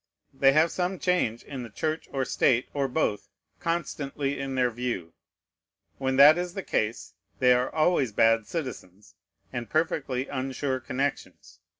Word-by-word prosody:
They 135 0 +4
have 155 +3 +4
some 185 +1 -1
change 175 -13 0
in 135 -2 -7
the 120 - -7
Church 155 +10 -3
or 135 -1 -1
State, 125 0 +2
or 140 -1 0
both, 125 -6 -1 0.3
constantly 145 -4 -2
in 135 -1 -3
their 125 -1 +2
view. 115 -8 -4 0.9
When 130 -1 0
that 150 +5 +8
is 180 0 -4
the 195 - -4
case, 110 -6 -2 0.2
they 125 -1 +5
are 125 +1 +1
always 155 -6 +2
bad 115 +1 +3
citizens, 105 - -7 0.4
and 120 -1 -4
perfectly 150 -5 -1
unsure 130 0 -2
connections. 135 +3 -4
135 Hz, 150 wpm, -27 LUFS, 125-155 Hz, 0.9 s, that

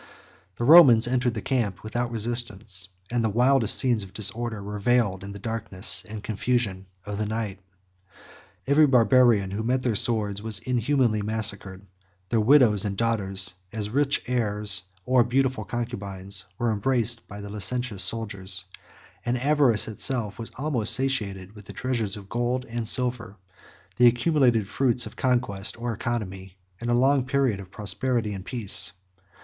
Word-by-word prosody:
The - - -4
Romans 130 -6 +8
entered 125 -1 0
the 110 - -5
camp 115 -8 -1
without 120 +3 -2
resistance; 110 -5 -1 0.2
and 120 -1 0
the 110 - +1
wildest 120 +1 +4
scenes 120 -5 +2
of 95 -1 -9
disorder 110 +1 -2
were 105 +1 -6
veiled 100 -4 +1
in 100 - -7
the 100 - -8
darkness 100 -2 -2
and 105 -1 -7
confusion 110 -4 -2 0.2
of 105 0 -5
the 105 - -1
night. 110 -3 -4 1.1
Every 145 +2 +5
Barbarian 120 -5 +4
who 100 +2 -3
met 125 +3 0
their 120 - +1
swords 105 -2 -1
was 110 -1 0
inhumanly 120 +1 0
massacred; 100 -2 -4 0.4
their 115 - +1
widows 110 -4 +5
and 100 -2 -3
daughters, 95 -5 +3 0.2
as 105 -1 -4
rich 140 +2 +1
heirs, 105 -5 0 0.2
or 130 -1 +4
beautiful 130 -2 0
concubines, 100 -5 -5
were 120 -1 0
embraced 115 +1 0
by 100 - -9
the 100 0 -8
licentious 105 0 -1
soldiers; 100 -4 -1 0.6
and 120 +1 -1
avarice 135 -4 +2
itself 110 -1 -3
was 115 - -6
almost 130 -6 +1
satiated 105 -8 -2
with 105 -2 -14
the - - -10
treasures 115 -5 -2
of 100 -2 -11
gold 120 +3 -2
and 115 -2 -4
silver, 120 -3 0 0.6
the 125 - +6
accumulated 120 -4 +2
fruits 125 0 0
of 110 - -10
conquest 120 -5 -1
or 120 0 -3
economy 95 -5 -5 0.2
in 120 - -3
a 120 - +3
long 135 +2 +3
period 130 -5 0
of 95 -2 -10
prosperity 105 +3 -1
and 95 -1 -8
peace. 115 -6 -2
115 Hz, 155 wpm, -25 LUFS, 100-125 Hz, 1.1 s, Romans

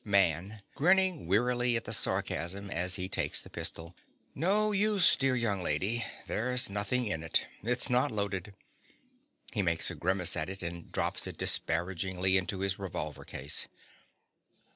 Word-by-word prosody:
MAN. 100 +1 +1
(grinning 185 - +2
wearily 120 +5 +2
at 115 - 0
the - - -4
sarcasm 100 +4 0
as 90 +2 +2
he 95 -1 -1
takes 95 - 0
the - - -11
pistol). 85 +1 -3 0.4
No 205 +7 +1
use, 205 -2 +4
dear 135 -1 +1
young 110 -6 -1
lady: 95 +9 -1 0.2
there's 125 0 +2
nothing 105 +5 0
in 80 -7 -2
it. 80 - +1 0.2
It's 125 +3 +1
not 125 +3 +2
loaded. 100 -2 -4 1.0
(_He 105 -5 0
makes 85 -2 +1
a - - -6
grimace 90 -1 0
at 80 - -2
it, 95 -1 -6
and 85 0 -6
drops - - -1
it - - -8
disparagingly 95 +2 0
into 95 0 0
his 95 0 -1
revolver 75 -7 -5
case. 70 +1 0
100 Hz, 150 wpm, -30 LUFS, 90-125 Hz, 1.0 s, use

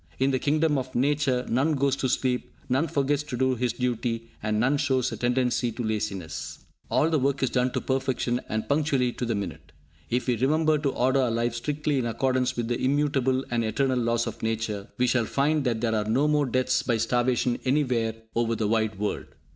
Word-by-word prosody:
In 135 +1 +2
the 130 - +1
kingdom 150 0 +2
of 130 0 -7
Nature, 135 -1 +1
none 140 +6 +2
goes 140 -1 +1
to 130 - -1
sleep, 125 0 -1 0.2
none 135 +6 +1
forgets 145 0 +1
to 140 -4 -5
do 130 +1 +2
his 125 0 0
duty, 120 -2 -2
and 105 0 0
none 135 +5 +2
shows 130 -3 +1
a - - -3
tendency 125 0 +1
to 120 - -4
laziness. 100 -7 -4 0.2
All 160 - +2
the 155 - +3
work 135 +1 0
is 130 - +1
done 125 0 +2
to - - -1
perfection, 130 -2 -1
and 110 0 -2
punctually 140 -4 +1
to 125 - -4
the 115 - 0
minute. 100 -1 -6 0.4
If 125 +1 0
we 125 -2 +1
remember 155 +5 +2
to 145 -1 0
order 130 +1 +2
our 125 - +1
lives 115 +1 -1
strictly 150 +2 -1
in 120 - -1
accordance 130 +1 0
with 120 -1 -1
the 120 0 -2
immutable 135 -1 +1
and 120 -1 +1
eternal 130 +4 +1
laws 115 0 +1
of - - -6
Nature, 110 -2 -2
we 125 - +3
shall 120 -1 +2
find 145 +4 +1
that 115 -3 0
there 115 -2 +1
are 105 -1 0
no 125 +7 +2
more 150 -2 +2
deaths 130 +1 +1
by 120 -3 0
starvation 120 +1 +1
anywhere 125 -5 +1 0.2
over 115 0 +1
the 110 -1 -1
wide 110 -1 0
world. 105 +1 -3
125 Hz, 210 wpm, -26 LUFS, 115-135 Hz, 0.4 s, the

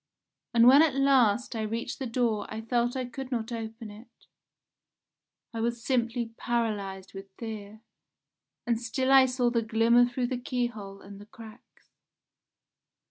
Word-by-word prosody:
And 230 0 +6
when 275 +4 +8
at 315 -5 +3
last 255 -4 +3
I 220 - -2
reached 230 +5 -4
the 265 - -3
door 230 -3 -1
I 215 - -5
felt 240 +2 0
I 260 -1 -2
could 260 +2 -8
not 230 -2 -3
open 225 -1 -6
it. 215 +4 -16 1.3
I 225 - -4
was 235 0 -2
simply 235 -2 -1
paralysed 205 -5 -3
with 195 0 -9
fear. 215 -2 -8 0.8
And 235 -1 0
still 260 +3 -1
I 265 -1 +7
saw 250 -1 0
the 235 -1 +1
glimmer 230 +2 +4
through 245 +1 -2
the 245 0 -3
key 245 0 -1
hole 200 -4 -8
and 200 0 -12
the 205 - -13
cracks. 225 +1 -15
235 Hz, 155 wpm, -28 LUFS, 220-245 Hz, 1.3 s, when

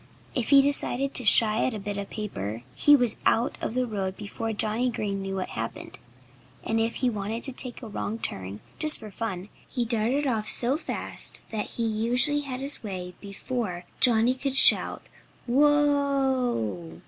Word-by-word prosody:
If 245 -4 -2
he 275 -1 +7
decided 275 -1 0
to 250 - +3
shy 215 0 +7
at 255 - -1
a - - -5
bit 205 +1 -5
of 200 0 -6
paper 115 - -6
he 290 - +5
was 245 -5 +3
out 235 +2 +1
of 225 - -4
the 255 0 +1
road 195 -4 -4
before 225 +2 -5
Johnnie 220 +3 0
Green 200 -4 -3
knew 195 0 -4
what 185 -1 -4
had - - -5
happened. - - -8 0.6
And 225 - -1
if 225 +1 -1
he - - +3
wanted 215 +2 -4
to 270 - 0
take 250 0 0
a - - -6
wrong 215 +1 -4
turn, 95 - -4 0.2
just 310 -1 +3
for 215 -2 -10
fun, 195 -2 -5 0.2
he 245 -3 -3
darted 235 +5 0
off 220 -5 -1
so 250 +3 +3
fast 315 - -1
that 215 -2 -3
he 235 - -1
usually 240 +7 +1
had 265 -2 -6
his 280 +1 +1
way 185 -5 -6
before 200 -3 -5
Johnnie 235 0 +3
could 265 +1 -4
shout 270 - +4 0.4
"Whoa!" 265 - +1
225 Hz, 180 wpm, -26 LUFS, 205-260 Hz, 0.6 s, he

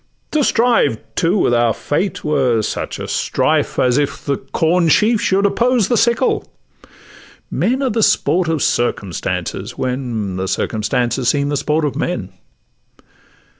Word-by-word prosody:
To 305 -2 +2
strive, 235 - +2 0.2
too, 170 - +1
with 120 - +2
our 120 -2 +2
fate 185 +7 -2
were 130 -7 +1
such - - -4
a - - -6
strife - - 0
As 125 +2 +3
if 145 - -3
the 140 -2 0
corn 165 +5 +1
sheaf 215 +6 +3
should 195 +1 +2
oppose 235 0 +2
the 245 - +2
sickle: 235 +2 +1 1.0
Men 260 +4 0
are 260 - +1
the 225 +1 0
sport 180 -4 +2
of 160 -3 0
circumstances, 100 -7 -2
when 120 -7 -3
The 95 +1 -2
circumstances 120 +5 -1
seem 140 +1 +1
the 145 - -1
sport 150 +2 0
of 140 - -2
men. 120 - -3
145 Hz, 145 wpm, -18 LUFS, 120-205 Hz, 1.0 s, As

